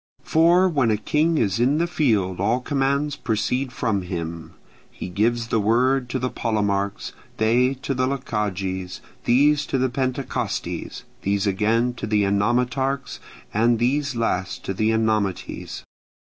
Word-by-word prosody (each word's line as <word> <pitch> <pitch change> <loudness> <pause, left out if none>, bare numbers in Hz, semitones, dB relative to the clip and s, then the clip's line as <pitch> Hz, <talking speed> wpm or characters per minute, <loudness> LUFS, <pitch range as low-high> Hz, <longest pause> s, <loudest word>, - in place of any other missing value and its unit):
For 170 +3 +4
when 140 -9 +1
a 110 - +2
king 155 +9 +1
is 100 -3 +1
in 130 +5 +3
the 170 - +2
field 105 - 0
all 110 +6 +2
commands 140 +2 0
proceed 125 +3 -1
from 110 -5 -1
him: 85 -2 -6 0.3
he - - -7
gives 115 +5 0
the 115 - +2
word 125 +4 +2
to 130 - -1
the 130 0 -2
Polemarchs; 100 -3 -1 0.3
they 125 +4 +3
to 135 - -1
the 130 0 0
Lochages; 95 -8 -3 0.2
these 145 +4 +4
to - - 0
the 130 0 +1
Pentecostyes; 130 +1 -3 0.2
these 100 +1 0
again 110 +5 +1
to 120 - -6
the 105 -1 +2
Enomotarchs, 125 +7 0 0.3
and 115 +2 +3
these 135 +3 0
last 95 -5 -2
to 95 - -2
the 110 +3 +1
Enomoties. 110 -4 -1
115 Hz, 145 wpm, -23 LUFS, 100-135 Hz, 0.3 s, For